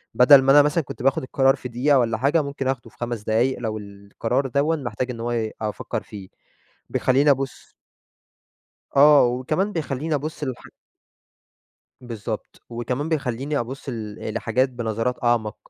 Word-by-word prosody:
بدل 135 +2 +8
ما 135 - +4
أنا 145 - +8
مثلًا 150 +3 +1
كنت 125 - -8
باخد 135 0 +2
القرار 135 +1 +2
في 130 -2 -8
دقيقة 130 +4 +3
والّا 115 -2 0
حاجة، 140 +7 +2
ممكن 140 -2 -4
أخده 125 -3 -3
في - - -27
5 120 -3 -4
دقايق 115 +5 +1
لو 110 -2 -3
القرار 105 +6 -3
دَوًّا 140 +5 +1
محتاج 125 -2 -4
إن 115 - -8
هو 120 +1 -2
ي 115 -2 -1
أفكّر 105 -1 -4
فيه. 100 -3 -10 0.6
بيخلّيني 135 +3 +2
أبُص 135 -1 -3 1.2
آه، 145 0 +7
وكمان 130 +11 -1
بيخلّيني 155 -2 -2
أبُص 150 +2 -4
للح 130 -3 -5 1.4
بالضبط. 115 -5 -7
وكمان 125 +6 -3
بيخلّيني 140 -1 -2
أبُص 130 +4 -6
ل 110 -3 -5
لحاجات 120 +3 +1
بنظرات 120 0 -3
أعمق، 115 -3 +1
125 Hz, 155 wpm, -23 LUFS, 115-140 Hz, 1.4 s, بدل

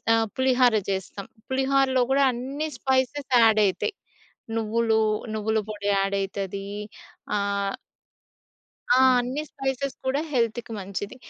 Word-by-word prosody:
ఆ - - +3 0.2
పులిహార 255 -2 +4 0.2
చేస్తాం. 190 +1 -5 0.2
పులిహోరలో 265 -1 +2
కూడా 275 0 +4
అన్ని 275 +6 -4
స్పైసెస్ 265 +2 0
యాడ్ 220 -1 +5
అయితాయి. 200 - -1 0.6
నువ్వులు, 225 0 +1 0.4
నువ్వుల 220 +1 0
పొడి 205 -1 -5
యాడ్ 195 0 +1
అయితది. 195 0 -4 0.7
ఆహ్ 200 -1 -1 1.2
ఆ! - - +4 0.2
అన్ని 255 +5 -2
స్పైసెస్ 270 0 -3
కూడా 270 +3 +1
హెల్త్‌కి 235 -1 0
మంచిది. 200 +3 -5
235 Hz, 110 wpm, -25 LUFS, 200-265 Hz, 1.2 s, యాడ్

